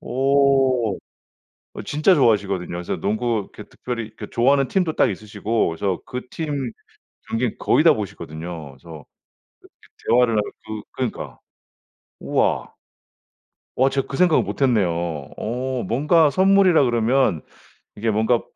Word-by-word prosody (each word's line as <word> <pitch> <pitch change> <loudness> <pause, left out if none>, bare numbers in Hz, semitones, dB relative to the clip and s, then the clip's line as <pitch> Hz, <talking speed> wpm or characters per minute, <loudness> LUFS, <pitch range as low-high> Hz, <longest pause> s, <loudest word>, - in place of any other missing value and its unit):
오. 135 -4 +2 0.8
어 - - -6
진짜 155 +5 +3
좋아하시거든요. 100 - +1
그래서 85 0 -3
농구 110 0 -1
이렇게 - - -9
특별히 115 -3 -6 0.2
좋아하는 135 +2 +2
팀도 180 +1 0
딱 - - +3
있으시고 105 +2 -2
그래서 90 +3 -2
그 125 0 -5
팀 145 -6 -4 0.6
경기 115 0 -1
거의 - - +2
다 - - +8
보시거든요. 80 -1 -7
그래서 80 +1 -12
그 - - -46 1.0
이 - - -9
대화를 125 -1 +4
하면 105 - +2 0.2
그 110 -1 -6
그러니까. - - -5 0.8
우와. - - 0 1.1
와 130 +2 +4
제가 135 -1 -1
그 135 - -5
생각을 175 -1 +4
못했네요. 120 -9 +1 0.5
어 125 +3 -3
뭔가 150 +5 +3
선물이라 190 -2 +4
그러면 120 - +1 0.5
이게 110 +2 -1
뭔가 110 +3 +2
120 Hz, 290 characters per minute, -22 LUFS, 105-135 Hz, 1.1 s, 다